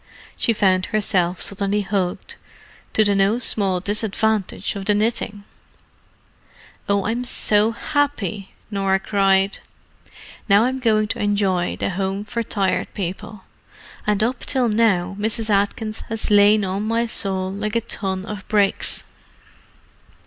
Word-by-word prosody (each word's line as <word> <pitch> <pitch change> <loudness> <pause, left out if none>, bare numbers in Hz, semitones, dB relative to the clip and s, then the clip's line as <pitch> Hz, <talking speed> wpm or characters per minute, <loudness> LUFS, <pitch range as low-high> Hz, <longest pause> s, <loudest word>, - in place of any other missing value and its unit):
She 235 - +2
found 190 -4 +2
herself 185 -5 +1
suddenly 200 +1 +1
hugged, 190 -2 -3 0.6
to 215 - +4
the 205 -1 +2
no 200 +3 +2
small 200 -6 +1
disadvantage 210 0 -1
of 195 -1 -5
the 210 - +2
knitting. 210 -1 -1 1.5
"Oh, 200 -1 +1
I'm 235 +3 -1
so 215 -3 +3
happy!" 230 - -2 0.2
Norah 195 -1 +1
cried. 195 -1 +2 0.9
"Now 200 +2 +6
I'm 260 +2 -1
going 215 -4 +2
to - - -2
enjoy 200 -4 0
the - - -2
Home 195 +2 -2
for 235 +2 -3
Tired 190 -5 -1
People: 200 +2 -5 0.6
and 210 0 +2
up 245 +4 -1
till 250 -3 0
now 195 -4 +1
Mrs. 220 +1 -1
Atkins 210 +2 0
has 225 -1 -2
lain 205 0 +5
on 190 +2 -2
my 230 +1 +1
soul 190 -4 0
like 210 +3 -4
a 230 - +2
ton 190 -3 -3
of 210 -2 -7
bricks. 205 -2 +1
205 Hz, 135 wpm, -21 LUFS, 195-220 Hz, 1.5 s, Now